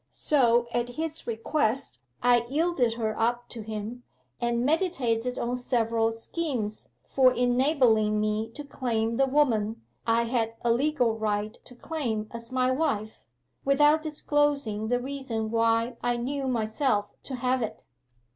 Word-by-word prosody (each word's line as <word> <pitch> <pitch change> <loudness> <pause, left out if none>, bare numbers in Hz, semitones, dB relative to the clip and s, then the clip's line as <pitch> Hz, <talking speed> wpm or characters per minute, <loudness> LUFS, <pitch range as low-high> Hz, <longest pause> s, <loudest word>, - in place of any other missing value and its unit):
So 240 -5 +3
at 240 0 0
his 315 +5 -5
request 225 - -1 0.2
I 240 -1 +4
yielded 290 -6 +1
her 220 -2 -2
up 240 +2 0
to 230 - -7
him, 215 +3 -5 0.4
and 235 0 0
meditated 255 -8 0
on 240 +1 -1
several 230 -2 +1
schemes 225 -2 -3 0.2
for 260 -2 +4
enabling 245 -4 +3
me 215 +1 0
to 295 - -6
claim 230 -5 -1
the 270 - +3
woman 230 -6 +1 0.2
I 230 +1 +3
had 230 -1 -1
a 235 - +3
legal 245 -4 +1
right 210 0 -1
to 250 - -13
claim 240 -7 -3
as 235 0 -8
my 255 0 +2
wife, 220 -7 -1 0.4
without 295 +3 +4
disclosing 290 -8 0
the 245 +2 +1
reason 250 -5 -4
why 230 +1 +2
I 240 0 0
knew 270 +3 -2
myself 220 -2 0
to 265 - -5
have 255 +1 0
it. 225 - -4
240 Hz, 140 wpm, -27 LUFS, 225-270 Hz, 0.4 s, I